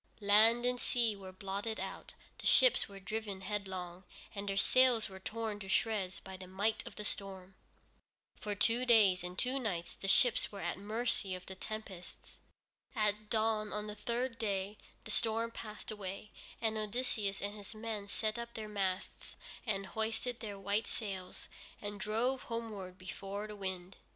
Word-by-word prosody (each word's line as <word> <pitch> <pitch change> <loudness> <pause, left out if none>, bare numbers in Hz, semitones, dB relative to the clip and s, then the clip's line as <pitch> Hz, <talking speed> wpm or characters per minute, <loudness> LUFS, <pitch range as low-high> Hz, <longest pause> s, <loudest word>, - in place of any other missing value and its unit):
Land 220 +3 +6
and 250 0 +2
sea 235 -4 +2
were 190 -1 -8
blotted 200 +3 -3
out, - - -5 0.2
the - - -1
ships - - +6
were 200 -1 -9
driven 200 0 -3
headlong, 190 -3 -3 0.3
and 200 -1 -3
their 195 - 0
sails 250 -1 +5
were 190 0 -9
torn 215 +1 -3
to 195 -2 -7
shreds 195 -4 +2
by 190 0 -8
the 185 0 -8
might 200 +4 +1
of - - -8
the 210 - -4
storm. 190 -2 -4 0.9
For 210 -1 -2
two 230 +4 +3
days 210 -7 +6
and 180 +1 -5
two 255 +5 +2
nights 180 -9 -2
the 195 - -4
ships 240 +4 +5
were 200 -1 -6
at 175 +1 -1
the - - -11
mercy 215 -2 0
of 180 0 -8
the 190 - -6
tempests. 190 -2 -7 0.6
At 210 -1 +1
dawn 215 -1 +2
on 210 0 -1
the 210 - -4
third 235 +3 -1
day, 200 -1 -1 0.2
the 215 - -4
storm 230 +1 +1
passed 215 -2 -6
away, 205 0 -5 0.3
and 220 -1 +1
Odysseus 215 -2 -1
and 205 +1 -2
his 210 +1 -9
men 215 -2 -3
set 215 +2 -1
up 235 0 -6
their 220 -1 -4
masts 195 -2 -2 0.3
and 195 -2 0
hoisted 225 +4 -2
their 205 -3 -4
white 200 +3 0
sails, 190 -4 -4 0.3
and 205 0 -5
drove 230 +6 +1
homeward 210 -6 -4
before 195 +2 -5
the 210 0 -7
wind. 190 -2 -4
210 Hz, 170 wpm, -35 LUFS, 195-225 Hz, 0.9 s, Land